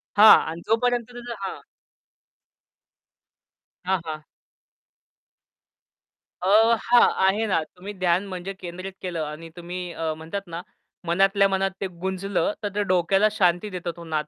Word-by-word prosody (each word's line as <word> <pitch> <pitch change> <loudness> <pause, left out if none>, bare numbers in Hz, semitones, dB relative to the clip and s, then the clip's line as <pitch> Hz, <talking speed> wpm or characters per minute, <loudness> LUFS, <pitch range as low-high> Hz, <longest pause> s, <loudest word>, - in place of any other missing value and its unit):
हां. 215 +1 +9
आणि 165 +1 -6
जोपर्यंत 240 +1 +1
तुझं 240 0 -7
हां. 195 -1 -5 2.3
हां, 190 0 +1
हां. 155 -1 -6 2.2
अ, 180 - -2 0.3
हां, 240 0 +5 0.2
आहे 205 +4 +2
ना. 185 - +1
तुम्ही 185 +6 -10
ध्यान 185 0 +1
म्हणजे 185 0 -6
केंद्रित 185 0 -8
केलं 175 -4 -3
आणि 155 +2 -8
तुम्ही 175 0 -6
अ, 160 -1 -2
म्हणतात 165 +5 -5
ना 170 0 -6 0.5
मनातल्या 195 +3 +3
मनात 195 0 0
ते 195 - -1
गुंजलं 190 - -2
तर 205 - -1
ते 210 - +1
डोक्याला 195 +2 +3
शांती 180 -1 +1
देतो 180 -3 -4
तो 170 - -9
नाद. 155 -2 -3
185 Hz, 135 wpm, -24 LUFS, 170-200 Hz, 2.3 s, हां